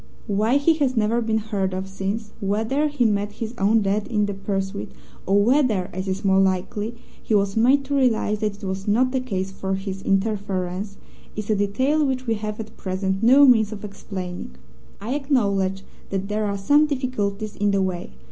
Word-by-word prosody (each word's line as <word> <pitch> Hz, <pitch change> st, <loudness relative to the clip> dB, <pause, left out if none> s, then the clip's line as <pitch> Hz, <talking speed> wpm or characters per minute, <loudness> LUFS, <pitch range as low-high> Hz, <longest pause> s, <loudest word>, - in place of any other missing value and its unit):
Why 215 Hz, +5 st, +2 dB
he 285 Hz, +4 st, +4 dB
has 265 Hz, -5 st, 0 dB
never 225 Hz, +2 st, +2 dB
been 220 Hz, -1 st, 0 dB
heard 200 Hz, -4 st, -2 dB
of 190 Hz, +1 st, -4 dB
since 195 Hz, +3 st, -4 dB
whether 220 Hz, +9 st, 0 dB
he 290 Hz, -5 st, 0 dB
met 205 Hz, -1 st, 0 dB
his 225 Hz, +1 st, -5 dB
own 210 Hz, +3 st, +3 dB
death 200 Hz, +1 st, 0 dB
in 210 Hz, -3 st, +1 dB
the 205 Hz, -, -3 dB
pursuit, 195 Hz, 0 st, -3 dB, 0.4 s
or 200 Hz, +1 st, +4 dB
whether, 235 Hz, -7 st, +2 dB
as 185 Hz, +2 st, -4 dB
is 190 Hz, +2 st, -3 dB
more 190 Hz, 0 st, +4 dB
likely, 195 Hz, +4 st, 0 dB, 0.3 s
he 220 Hz, -, 0 dB
was 200 Hz, -1 st, +1 dB
made 260 Hz, +5 st, +4 dB
to 285 Hz, +1 st, -2 dB
realize 225 Hz, -5 st, +2 dB
that 210 Hz, -1 st, -2 dB
it -, -, -18 dB
was 190 Hz, +1 st, -4 dB
not 250 Hz, +5 st, +2 dB
a 260 Hz, -, +2 dB
case 195 Hz, -7 st, -3 dB
for 190 Hz, 0 st, -3 dB
his 195 Hz, 0 st, -5 dB
interference 195 Hz, -1 st, -1 dB, 0.4 s
is 215 Hz, 0 st, -3 dB
a -, -, +3 dB
detail 260 Hz, +10 st, +1 dB
which 260 Hz, -2 st, -1 dB
we 225 Hz, -, +1 dB
have 210 Hz, 0 st, -4 dB
at 220 Hz, -, -8 dB
present 190 Hz, +1 st, -2 dB
no 265 Hz, +5 st, +7 dB
means 225 Hz, -5 st, +5 dB
of 210 Hz, -1 st, -6 dB
explaining. 185 Hz, -, -7 dB, 0.4 s
I 225 Hz, +6 st, -3 dB
acknowledge 200 Hz, -9 st, 0 dB, 0.3 s
that 195 Hz, 0 st, -3 dB
there 210 Hz, +1 st, 0 dB
are 200 Hz, 0 st, -2 dB
some 290 Hz, +10 st, +4 dB
difficulties 215 Hz, -7 st, -2 dB
in 205 Hz, 0 st, +1 dB
the 195 Hz, -1 st, +2 dB
way. 180 Hz, -, -4 dB
205 Hz, 195 wpm, -23 LUFS, 195-230 Hz, 0.4 s, no